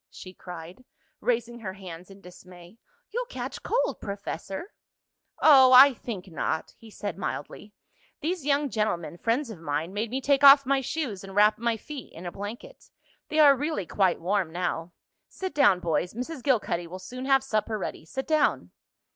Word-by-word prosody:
she 185 - -11
cried, 175 +5 -10 0.4
raising 240 0 -1
her 190 -4 -6
hands 180 -2 -10
in 195 0 -14
dismay. 180 +2 -15 0.3
"You'll 485 +2 -3
catch - - -6
cold, - - -1
Professor." 200 - -6 0.7
"Oh, 265 -4 +7
I 270 +2 +9
think 215 -6 -7
not," 160 -1 -3
he 225 - -15
said 205 -3 -6
mildly. 205 +1 -6 0.4
"These 340 0 -2
young 285 -1 +1
gentlemen, 175 -6 -2
friends 235 +2 0
of 195 - -10
mine, 160 +3 -3
made 215 +3 -2
me 260 +3 -2
take 280 +1 +1
off 275 0 +9
my 275 +1 +2
shoes 255 -8 -4
and 195 0 -10
wrap 210 +1 +4
my 235 -1 0
feet 280 +3 -9
in 170 - -10
a 175 - -4
blanket. 225 - -9 0.4
They 310 - -2
are 290 -3 +7
really 290 - -2
quite 190 0 +1
warm 185 -1 0
now. 175 -1 -3 0.4
Sit 375 -4 -6
down, 205 -10 +4
boys. 170 +3 -1
Mrs. 255 +4 -5
Gilcuddy 210 -10 0
will 180 +2 -8
soon 250 +8 -8
have 270 -1 +3
supper 215 -3 -1
ready. 185 - -5
Sit 265 +11 -5
down." 310 -1 +1
215 Hz, 170 wpm, -27 LUFS, 185-275 Hz, 0.7 s, I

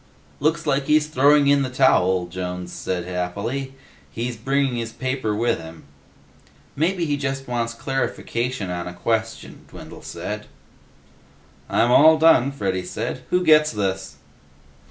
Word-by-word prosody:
"Looks 155 +3 0
like 135 0 +1
he's 150 0 +4
throwing 145 0 +4
in 140 0 +4
the 130 - -1
towel," 95 -9 +3
Jones, 90 0 -6
said 90 -2 -3
happily. 100 +10 -4 0.4
"He's 120 +5 -4
bringing 135 +2 0
his 115 -1 -4
paper 130 -3 -2
with 115 0 0
him." 80 0 -11 0.9
"Maybe 170 +4 0
he 145 -2 -1
just 135 -1 -3
wants 115 -1 -2
clarification 125 -5 -3
on 90 0 -4
a 90 - -7
question," 115 +3 -3
Dwindle - - -11
said. - - -6 1.2
"I'm 120 - +2
all 155 +5 +7
done," 155 -5 +5
Freddy 95 -9 -2
said. 115 +7 -4
"Who 180 0 +2
gets 155 -2 +5
this?" 95 -2 -3
125 Hz, 135 wpm, -22 LUFS, 95-140 Hz, 1.2 s, all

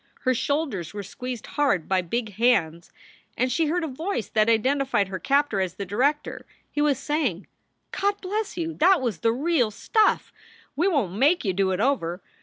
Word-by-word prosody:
Her 255 - +2
shoulders 255 - -2
were 205 - -4
squeezed 245 +4 -6
hard 275 - 0
by 190 -1 +2
big 215 +4 -3
hands 185 -8 +1 0.5
and 255 +1 +1
she 320 +5 +1
heard 345 +3 0
a - - -1
voice 315 - -3
that 215 0 +2
identified 255 -2 +1
her 190 -1 -4
captor 280 -8 +1
as 185 -2 -2
the 200 - -5
director. 270 +10 -1 0.2
He 295 - -1
was 290 -3 +2
saying: 270 - -1 0.5
"God 405 +1 0
bless 405 +1 -3
you! 330 -1 -2
That 360 +4 +4
was 230 -10 -2
the 225 - +2
real 270 -1 +1
stuff! 430 - +1 0.4
We 335 +7 +2
won 280 - +1
t 190 - -7
make 295 +2 +3
you 190 - +1
do 195 +1 +1
it 185 0 -1
over. 195 -9 0
255 Hz, 190 wpm, -25 LUFS, 200-300 Hz, 0.5 s, That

